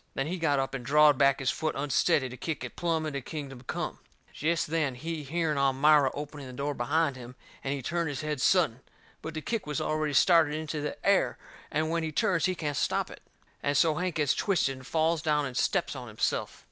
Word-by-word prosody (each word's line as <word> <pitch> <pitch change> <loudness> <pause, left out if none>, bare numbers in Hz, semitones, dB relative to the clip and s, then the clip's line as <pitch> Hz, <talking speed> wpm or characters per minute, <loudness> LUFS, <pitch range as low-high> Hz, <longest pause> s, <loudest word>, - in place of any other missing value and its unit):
Then 135 - -1
he 175 +4 -3
got 145 -4 +2
up 135 0 -1
and 130 -2 -4
drawed 150 +1 +5
back 140 -1 +5
his 135 -1 0
foot 155 -1 -2
unsteady 145 0 +2
to 125 - -8
kick 160 +4 -4
it - - -7
plumb 165 -2 0
into 140 -3 -3
kingdom 135 -2 -7
come. 125 - -4 0.3
Jest 165 +2 0
then 150 -4 -1
he 160 +4 -5
hearn 155 0 -1
Elmira 140 +1 +4
opening 145 -1 -7
the 130 - -9
door 140 +3 -2
behind 140 +3 0
him, 125 0 -10 0.3
and 135 - -2
he 135 - -6
turned 170 +3 -1
his 140 0 -4
head 150 -3 -3
sudden. 160 -11 +3 0.4
But 160 0 -6
the 155 - -3
kick 225 0 -3
was 150 -2 -2
already 155 -1 -1
started 160 -1 +5
into 155 -1 -3
the 150 - -4
air, 200 0 +3 0.3
and 155 +1 0
when 170 0 0
he 160 -1 -3
turns 165 +3 +1
he 185 -1 +1
can't 150 -4 -3
stop - - 0
it. - - -12 0.4
And 145 0 +1
so 160 +1 +4
Hank 175 +2 -2
gets 150 -3 +2
twisted 175 -9 +1
and 130 0 -12
falls 160 0 +1
down 150 -2 +1
and 130 -2 -6
steps - - 0
on - - -7
himself. - - -2
150 Hz, 225 wpm, -29 LUFS, 140-160 Hz, 0.4 s, drawed